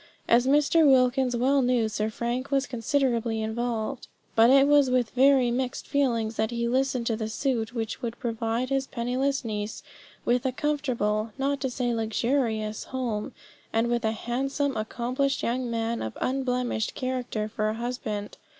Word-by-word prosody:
As 240 +2 +4
Mr. 295 +3 +4
Wilkins 255 -1 +3
well 270 +3 +3
knew, 245 -3 +2
Sir 215 0 -2
Frank 240 +4 -3
was 275 -1 +1
considerably 240 -3 0
involved; 220 +1 -3 0.3
but 230 +1 +6
it 275 +1 +6
was 290 -2 +5
with 250 -3 +1
very 260 -1 +4
mixed 255 +1 -2
feelings 230 -6 0
that 220 0 +1
he 235 -1 -1
listened 255 0 0
to 230 - +1
the 220 0 -3
suit 240 -1 -1
which 225 +1 -3
would 235 -1 -4
provide 230 +1 -2
his 270 0 0
penniless 260 +2 -1
niece 210 -1 -4 0.4
with 245 0 +2
a 260 - 0
comfortable, 240 -7 -1
not 280 +1 -1
to 265 - 0
say 245 -1 -1
luxurious, 225 -1 -1
home, 240 -5 -3 0.4
and 225 +1 +1
with 240 0 0
a 220 - +2
handsome, 270 +5 -2
accomplished 250 +5 -1
young 245 +1 -1
man 230 0 -1
of 110 - -5
unblemished 250 -4 -1
character 250 -4 -2
for 215 0 -1
a 215 - -2
husband. 225 -3 -4
245 Hz, 160 wpm, -27 LUFS, 225-265 Hz, 0.4 s, but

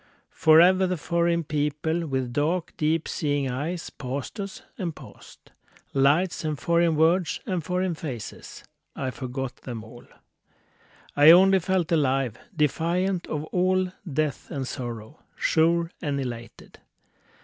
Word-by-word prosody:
Forever 180 +4 +5
the 180 0 -1
foreign 170 +1 0
people 155 +3 -1
with 130 -3 -2
dark, 160 +5 0
deep 155 +1 0
seeing 145 -3 -1
eyes 160 +7 -4
Passed 140 - -6
us 195 -1 -6
and 170 -4 -4
passed. - - -15 0.4
Lights 145 +8 +2
and 155 -2 -2
foreign 170 +3 +2
words 165 +2 +2
and 180 -3 -2
foreign 180 +1 -1
faces, 130 -9 -7 0.3
I 130 -2 -3
forgot 130 0 -5
them 115 -4 -7
all; 120 +2 -14 1.1
I 145 +2 +7
only 190 +3 +7
felt 180 -1 0
alive, 135 -7 +1 0.2
defiant 170 +5 0
of 150 -1 -3
all 185 0 +2 0.2
death 150 0 -2
and 135 -2 -4
sorrow, 120 +2 -6 0.2
Sure 165 +1 +2
and 145 -3 -1
elated. 120 -3 -7
155 Hz, 125 wpm, -25 LUFS, 135-175 Hz, 1.1 s, I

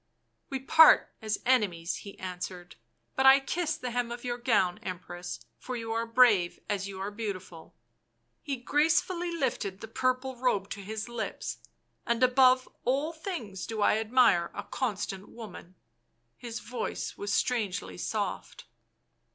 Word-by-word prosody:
" - - -48
We 270 - -2
part 320 +4 +6
as 215 -1 -1
enemies," 195 -10 +1
he 200 - -10
answered, 180 -1 -6 0.2
" 115 0 -46
but 265 0 +4
I 270 +1 +9
kiss 315 +3 -2
the 250 - -4
hem 240 0 -1
of 240 0 -6
your 245 -1 -3
gown, 215 -7 +2
Empress, 175 -7 -6 0.2
for 255 - -5
you 225 -1 -4
are 230 0 -1
brave 230 -7 +4
as 200 -2 -1
you 195 -1 -7
are 195 +2 -3
beautiful." 190 -6 -6 0.7
He 280 - -3
gracefully 325 +7 +1
lifted 235 - -2
the 225 - -8
purple 255 +3 -1
robe 220 -6 0
to 200 - -5
his 215 +3 -5
lips. 235 -2 -4 0.2
" - - -46
And 235 +1 +1
above 255 0 +5 0.2
all 280 +6 0
things 315 - -5
do 220 -2 -1
I 215 - +4
admire 220 -7 +4
a - - -4
constant 200 -5 -3
woman 195 -5 -10 0.3
"; 115 0 -46
his 235 -2 -7
voice 235 +1 -4
was 205 0 -4
strangely 200 -6 -1
soft. 210 +1 -3
225 Hz, 160 wpm, -29 LUFS, 195-255 Hz, 0.7 s, I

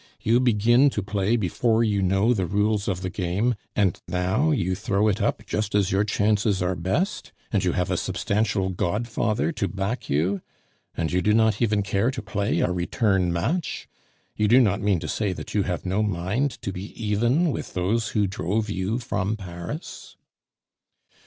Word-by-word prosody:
"You 115 +2 +3
begin 120 +3 +4
to 105 - 0
play 100 +2 0
before 115 +3 +1
you 105 -3 +1
know 95 +5 +3
the 95 -6 -1
rules 105 +2 +1
of 95 -2 -1
the 95 - -2
game, 95 +7 0 0.2
and 100 -4 +1
now 90 - +1
you 95 - +1
throw 100 +2 0
it 100 - -1
up - - -1
just 105 -1 -2
as 100 -2 +2
your 95 +2 +3
chances 105 -1 +1
are 90 0 0
best, 95 - -2 0.2
and - - +1
you - - +1
have - - -1
a - - +1
substantial 100 -2 0
godfather 110 - -1
to 105 -10 -2
back 100 +6 -3
you! 85 +8 +1 0.6
And 80 -1 -1
you 90 +1 +1
do 105 +4 +3
not 110 -1 +3
even 105 -3 +2
care 100 +4 +1
to 130 -2 -4
play 100 +1 -1
a - - +1
return 90 0 +1
match? 130 - -2 0.5
You 105 - +1
do 120 +5 +6
not 105 -5 +2
mean 100 -4 +2
to 80 - -4
say 100 +3 -1
that - - -8
you 105 - +2
have 90 0 -3
no 95 +3 0
mind 105 +7 -1
to - - -2
be 95 +3 -6
even 120 - +2
with - - -6
those 105 +6 0
who 105 - +3
drove 100 +3 -2
you 95 +5 -1
from 110 -3 -2
Paris?" 90 - -8
105 Hz, 185 wpm, -24 LUFS, 95-110 Hz, 0.6 s, do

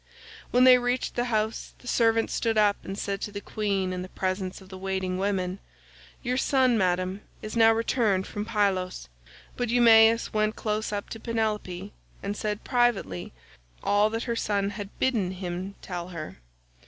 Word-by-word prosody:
When 250 +1 +4
they 255 -1 +8
reached 245 +1 -1
the 240 - 0
House, 220 -2 -2
the 245 - -15
servant 225 -2 +2
stood 225 -2 0
up 205 -1 +4
and 195 +1 -6
said 200 -1 -3
to 210 - -4
the 200 - -5
queen 195 -3 -1
in 180 - -3
the 185 - -7
presence 185 0 -3
of 190 - -15
the 190 - -8
waiting 190 -1 -2
women, 190 -1 -1 0.6
"Your 250 +1 0
son, 260 -2 +3
Madam, 185 0 0 0.2
is 215 +1 -5
now 225 -1 +6
returned 225 -4 +1
from 205 - -4
Pylos"; 195 - -1 0.5
but 245 -2 -2
Eumaeus 230 -1 +6
went 215 0 +1
close 215 0 -2
up 205 -1 -3
to 225 - -7
Penelope, 210 -4 -2 0.3
and 200 +1 -2
said 210 0 -3
privately 235 - 0 0.5
all 205 +1 +3
that 225 +1 -3
her 235 -2 -2
son 200 -3 0
had 200 0 -6
bidden 215 -8 +1
him 185 +1 -5
tell 175 -2 -5
her. 165 - -7
210 Hz, 170 wpm, -27 LUFS, 190-225 Hz, 0.6 s, they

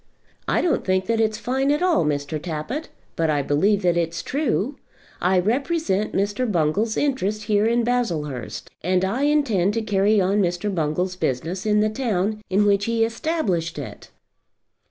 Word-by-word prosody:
"I - - +2
don't 325 -6 +1
think 185 0 +1
that 230 +1 0
it's 215 -1 +1
fine 265 +4 0
at 300 +4 +1
all, 355 - +3
Mr. 150 0 -2
Tappitt, 180 - -4 0.3
but 165 -1 +1
I 145 -2 +1
believe 195 +9 +2
that 175 -1 +3
it's 170 0 -1
true. 275 -2 -1 0.4
I 185 +1 +3
represent 225 - 0
Mr. 205 +4 0
Bungall's 190 +6 +1
interest 215 -7 0
here 210 +1 +2
in 235 +1 +2
Baslehurst, 160 - -2
and 185 +2 +1
I 240 +9 0
intend 230 -10 +2
to 225 - -1
carry 205 0 +2
on 195 +2 +2
Mr. 180 +3 -1
Bungall's 180 +3 -1
business 175 +6 -2
in 210 0 +3
the 215 - +2
town 215 -3 -1
in 200 +2 +3
which 200 0 +3
he 230 -1 +2
established 225 - -2
it." 145 - -8
205 Hz, 165 wpm, -23 LUFS, 175-230 Hz, 0.4 s, all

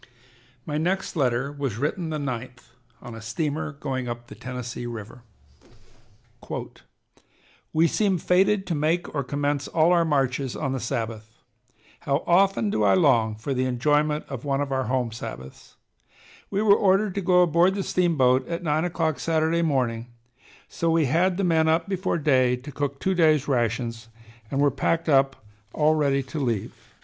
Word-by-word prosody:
My 150 0 -2
next 185 +4 -1
letter 135 -2 0
was 140 -7 -4
written 160 +6 -2
the 155 - -2
9th 125 -3 -6 0.3
on 120 -2 -8
a 115 - -9
steamer 150 +7 -3
going 130 -3 -4
up 120 0 -6
the - - -12
Tennessee 125 -1 -6
River: 115 0 -8 2.5
"We 160 +1 +3
seem 195 +2 +1
fated 190 +4 +2
to 180 - -2
make 160 +4 -1
or 140 -2 -1
commence 145 +1 -2
all 165 +1 +3
our 175 -1 +4
marches 135 -4 0
on 135 -3 -2
the 135 - -2
Sabbath. 115 -3 -5 0.6
How 140 +2 -1
often 195 +4 +3
do - - 0
I - - +5
long 120 - +3
for 115 +6 -4
the 130 0 0
enjoyment 150 +4 +1
of 135 -3 -7
one 140 -1 0
of 145 -1 -2
our 130 -1 0
home 125 -2 -1
Sabbaths. 65 - -9 0.7
We 200 +1 0
were 205 -2 +6
ordered 195 0 +2
to 200 - -2
go 180 -1 +4
aboard 175 +3 +3
the 200 - -2
steamboat 135 -10 +2
at 170 +1 -4
nine 155 +1 +1
o'clock 165 -3 -1
Saturday 165 +1 +1
morning, 125 -7 0 0.6
so 165 - -2
we 165 -1 +3
had 175 +7 +2
the 200 - 0
men 160 -3 +3
up 160 +3 +2
before 190 -2 -1
day 130 -5 +3
to 130 +4 -10
cook 140 0 -3
two 190 - 0
days' 155 -5 +3
rations 115 -3 -1 0.4
and 135 - -2
were 145 0 +4
packed 165 +5 -1
up 135 -5 +2 0.3
all 155 0 +3
ready 140 -3 +1
to 135 +4 -6
leave. 115 -7 -2
145 Hz, 170 wpm, -25 LUFS, 125-165 Hz, 2.5 s, were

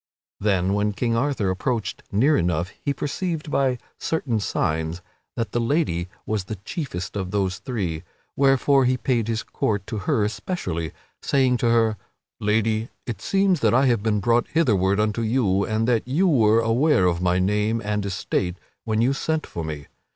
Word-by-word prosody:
Then 95 -2 +1
when 105 +1 +1
King 115 +4 0
Arthur 115 -6 0
approached 115 +4 -2
near 135 +10 +3
enough 85 - 0
he 140 - 0
perceived 150 +3 -3
by 130 -3 +2 0.2
certain 135 -8 -1
signs 80 -3 -1 0.4
that 115 -4 -2
the 120 - 0
lady 115 - 0 0.2
was 105 -4 -2
the 110 - -5
chiefest 100 - -5
of 95 -2 -3
those 95 -2 -1
three, 95 -11 -3 0.3
wherefore 135 0 +4
he 130 +1 +2
paid 120 -3 0
his 115 -1 -1
court 105 -3 -2
to 110 0 -4
her 120 -1 +1
especially, 95 - -3 0.3
saying 130 -3 +2
to 120 - +1
her: 115 -2 +3 0.4
"Lady, 110 +2 +1 0.2
it 120 - -5
seems 195 -3 +2
that 115 -2 +3
I 135 +2 +4
have 120 -5 +2
been 105 -1 +1
brought 120 +2 +2
hitherward 105 - +2
unto 105 +1 0
you 110 -4 +1
and 110 +1 0
that 120 -1 +1
you 160 +9 +2
were 115 -8 +4
aware 115 0 +3
of 85 -1 +1
my 90 0 +2
name 105 +4 +1
and 105 0 -1
estate 95 -2 -2 0.3
when 110 -1 +1
you 130 +4 +3
sent 160 +3 -1
for 85 - -6
me. 75 -2 -5
110 Hz, 175 wpm, -23 LUFS, 100-130 Hz, 0.4 s, wherefore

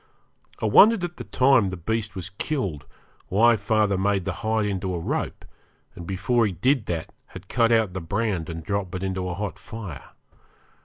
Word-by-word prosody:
I - - -2
wondered 205 - +6
at 175 0 -4
the 120 - -6
time 125 +1 +3
the 95 -1 -4
beast 105 +4 -2
was 90 -1 -5
killed 95 - -2 0.4
why 115 +5 +5
father 105 -1 +1
made 100 -1 +1
the - - -1
hide 110 -1 +1
into 95 -2 -2
a - - -2
rope, 80 - -3 0.5
and 85 - -9
before 110 +5 +1
he 100 - -3
did 125 - +1
that 85 -2 -4
had - - -11
cut 115 -1 +2
out 110 -5 +3
the 95 - -4
brand 95 -1 -2
and 80 -1 -6
dropped 100 0 -3
it 95 - -4
into 95 -1 -2
a 90 - -3
hot 105 +1 -4
fire. 105 - -9
100 Hz, 190 wpm, -24 LUFS, 90-115 Hz, 0.5 s, wondered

